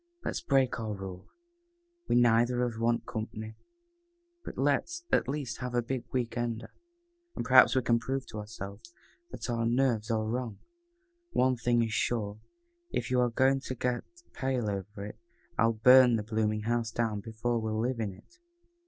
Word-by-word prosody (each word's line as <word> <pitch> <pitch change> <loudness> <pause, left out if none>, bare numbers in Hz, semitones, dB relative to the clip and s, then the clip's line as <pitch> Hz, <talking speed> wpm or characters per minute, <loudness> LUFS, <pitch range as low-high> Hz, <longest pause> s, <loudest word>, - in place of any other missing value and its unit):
"Let's - - -2
break 135 -3 +2
our 110 -2 -3
rule. 95 -2 -8 0.8
We - - +2
neither 120 +1 +4
of 120 - 0
us 110 - -8
want 115 +1 +1
company, 110 0 -5 0.9
but - - -8
let's, 345 0 0
at - - +3
least, 135 -3 -3
have 125 0 -4
a 120 - +2
big 125 +1 -3
week 120 -2 -1
ender, 120 -1 -3 0.6
and - - -3
perhaps 130 +2 +7
we 130 - +2
can 115 -1 +3
prove 135 +3 -3
to 110 - -6
ourselves 105 - -9 0.3
that - - -6
our 115 -2 -1
nerves 120 -3 +1
are 110 -1 +1
wrong. 115 -1 -3 0.8
One 130 0 +3
thing 120 0 +2
is 110 -1 -2
sure, 110 -3 -1 0.5
if - - -3
you 125 -1 +3
are 125 - +3
going 130 +3 +3
to 130 -1 -5
get 125 0 -1 0.3
pale 130 -5 -1
over 100 +1 -5
it, 105 - -9 0.4
I'll 115 0 +4
burn 125 +2 +7
the 110 - -1
blooming 110 -1 0
house 115 0 0
down 110 -2 -1
before 115 +3 -2
we'll 110 -1 -2
live 120 +1 -1
in 105 -3 -1
it." 350 - -21
115 Hz, 175 wpm, -30 LUFS, 110-125 Hz, 0.9 s, perhaps